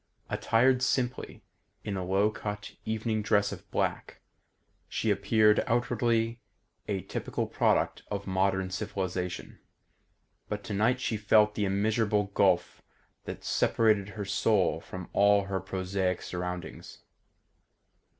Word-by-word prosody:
Attired 125 +3 +3
simply, 125 -1 -1 0.4
in 100 - -3
a 95 - -2
low 95 +4 +2
cut 105 0 -6
evening 110 0 -1
dress 100 -1 +2
of - - -9
black, - - -2 0.7
she - - 0
appeared 105 -1 +3
outwardly 115 -1 +1 0.5
a 100 -3 -2
typical - - -3
product - - +1
of 100 -1 -4
modern 95 0 0
civilisation; 90 -1 -4 0.9
but 105 0 -4
tonight 110 +5 +1
she 115 -3 -1
felt 105 +1 +4
the 105 - -1
immeasurable 105 +1 +1
gulf 95 -4 +2 0.4
that - - -7
separated 105 -3 +2
her 100 - -3
soul 100 -2 +2
from 95 0 -8
all 100 0 +5
her 95 -1 -2
prosaic 95 -1 -2
surroundings. 90 0 -6
105 Hz, 115 wpm, -29 LUFS, 95-110 Hz, 0.9 s, all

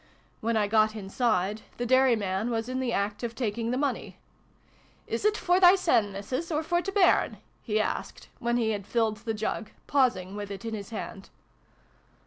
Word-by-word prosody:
When 230 0 0
I 210 - +3
got 215 0 +3
inside, 210 -1 0 0.2
the 245 - -2
dairyman 230 -5 +2
was 225 -1 -1
in 255 0 -2
the 255 -2 -1
act 205 0 -1
of 235 -1 -4
taking 230 -1 -2
the 250 - 0
money. 275 -1 -2 0.4
" - - -33
Is't 425 0 +1
for 360 0 +2
thysen, 355 - +5
Missus, 255 - -4
or 305 0 0
for 345 +2 +1
t' 390 - -4
bairn? 390 -2 +3
" - - -38
he 215 - +3
asked, 215 - -3
when 235 0 0
he 225 -2 +1
had 205 -2 -4
filled 225 -2 +1
the 225 +1 -4
jug, 215 0 -3 0.2
pausing 235 -9 +1
with 205 -1 -5
it 200 +3 -7
in 225 - -3
his 200 -3 -6
hand. 210 -3 -7
225 Hz, 185 wpm, -28 LUFS, 210-260 Hz, 0.4 s, thysen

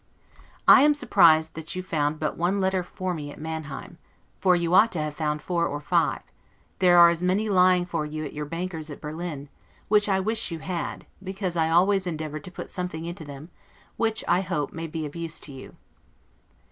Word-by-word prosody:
I - - +9
am 295 +1 +5
surprised 160 - +4
that 160 +2 -6
you 185 - -4
found 155 -4 -1
but 155 - -2
one 180 +4 0
letter 190 -1 +1
for 185 +1 -4
me 150 -3 -6
at - - -12
Manheim, 160 +1 -6 0.4
for 185 -2 +4
you 170 0 0
ought 220 +5 +6
to 170 - -2
have 150 -1 -3
found 150 -1 -2
four 170 -2 0
or 145 - -4
five; 145 - 0 0.6
there 180 -1 +5
are 170 0 +9
as 170 0 -3
many 190 +4 +1
lying 180 -1 +4
for 165 -3 -2
you 155 +1 -5
at - - -7
your 150 0 -4
banker's 165 0 -5
at 145 - -8
Berlin, 155 -2 -6 0.4
which 210 0 +4
I 190 -1 +2
wish 220 +2 0
you 165 - -4
had, 170 0 -5 0.2
because 190 -2 -3
I 160 -1 +2
always 185 +3 +3
endeavored 155 -2 -4
to 180 - -7
put - - -8
something 180 -3 -4
into 170 -2 -7
them, 145 +4 -10 0.4
which, 225 -1 0
I 175 +2 +3
hope, 170 -6 -3
may 165 0 -5
be 160 0 -4
of 145 - -8
use 165 -1 -4
to 145 - -6
you. 130 - -11
170 Hz, 205 wpm, -25 LUFS, 155-185 Hz, 0.6 s, I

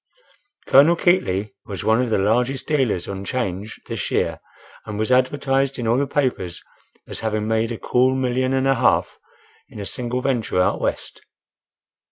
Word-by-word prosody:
Colonel 145 +6 +6
Keightly 105 - +1 0.2
was 100 -3 -5
one 110 +2 +3
of 125 - -1
the 110 - +2
largest 120 +7 0
dealers 130 - 0
on 100 0 -5
'Change 105 -3 -4
this - - -4
year - - 0 0.5
and 105 - -5
was 110 +3 -1
advertised 135 +1 +1
in 120 -3 -3
all 115 +2 +3
the 140 - 0
papers 125 -12 -1 0.4
as - - -6
having 110 -1 -2
made 110 +1 0
a 115 - -4
cool 130 +3 +2
million 130 0 0
and 135 0 +1
a 135 - +4
half - - +1 0.5
in - - -11
a 100 - -5
single 125 +3 -3
venture 120 -8 0
out 90 - +1
West. - - -3
125 Hz, 170 wpm, -21 LUFS, 105-130 Hz, 0.5 s, Colonel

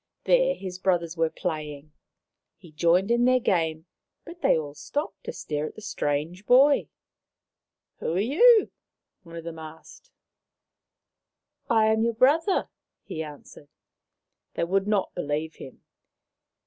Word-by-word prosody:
There - - +3
his 185 -1 -7
brothers 175 -3 0
were 165 -1 +1
playing. 155 -4 -5 0.7
He 170 - -16
joined 170 +6 +2
in 240 +1 +3
their 255 0 +4
game, 160 -7 0 0.4
but 340 +1 -11
they - - +4
all 145 -2 -5
stopped 290 - -5
to 475 - -4
stare 150 - -4
at - - -11
the - - -11
strange 170 0 -3
boy. 275 +3 +5 0.5
" - - -58
Who - - -2
are - - +1
you? 420 - +5 0.3
" - - -61
one 170 -3 -13
of 165 - -7
them 165 -1 -7
asked. 160 - -12 0.8
" - - -50
I 225 -2 +4
am 220 0 +1
your 230 0 0
brother," 315 - +2 0.3
he 160 - -6
answered. 145 -1 -11 0.9
They - - -1
would 195 +3 0
not 205 -3 0
believe 155 -1 -3
him. 130 - -12
180 Hz, 150 wpm, -26 LUFS, 160-240 Hz, 0.9 s, boy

